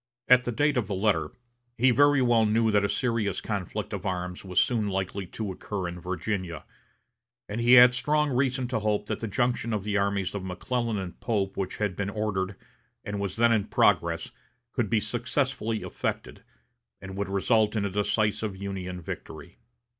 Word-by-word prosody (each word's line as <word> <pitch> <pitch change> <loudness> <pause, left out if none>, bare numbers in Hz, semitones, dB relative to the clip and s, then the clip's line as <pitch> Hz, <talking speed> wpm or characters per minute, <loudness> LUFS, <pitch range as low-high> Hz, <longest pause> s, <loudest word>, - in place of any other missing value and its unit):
At 125 0 +6
the 120 - -1
date 145 +4 +1
of 115 -5 0
the 100 - -2
letter, 105 +2 +1 0.5
he 125 +2 +5
very 145 +2 +4
well 120 -2 +4
knew 110 +1 +2
that 105 -1 +3
a 100 - +1
serious 115 -2 0
conflict 100 -5 -4
of - - -4
arms 90 -1 -3
was 90 -2 +1
soon 115 -4 +2
likely 95 0 -3
to 105 0 -4
occur 95 0 -4
in 85 0 -6
Virginia; 90 -2 -3 0.8
and 105 +3 -3
he 120 +1 +5
had 125 0 +9
strong 150 +3 +1
reason 130 0 0
to 120 -3 0
hope 105 -1 0
that - - -3
the 115 - -3
junction 120 +2 0
of 105 -2 -1
the 105 0 0
armies 100 -2 0
of 100 -2 -4
McClellan 115 +5 -2
and 95 -3 -6
Pope 100 -5 -1
which 95 -2 -3
had 105 -4 -1
been 100 -1 -2
ordered, 100 -2 -2 0.5
and 100 0 -3
was 100 -2 -3
then 115 +1 +4
in 110 -3 +2
progress, 85 -5 +2 0.4
could 120 -5 0
be 115 - +3
successfully 110 +2 -1
effected, - - -4 0.6
and 95 0 -8
would 100 0 -3
result 105 +2 +2
in 105 -2 0
a 100 - -2
decisive 105 0 0
Union 95 -2 -5
victory. - - -8
105 Hz, 185 wpm, -27 LUFS, 95-115 Hz, 0.8 s, had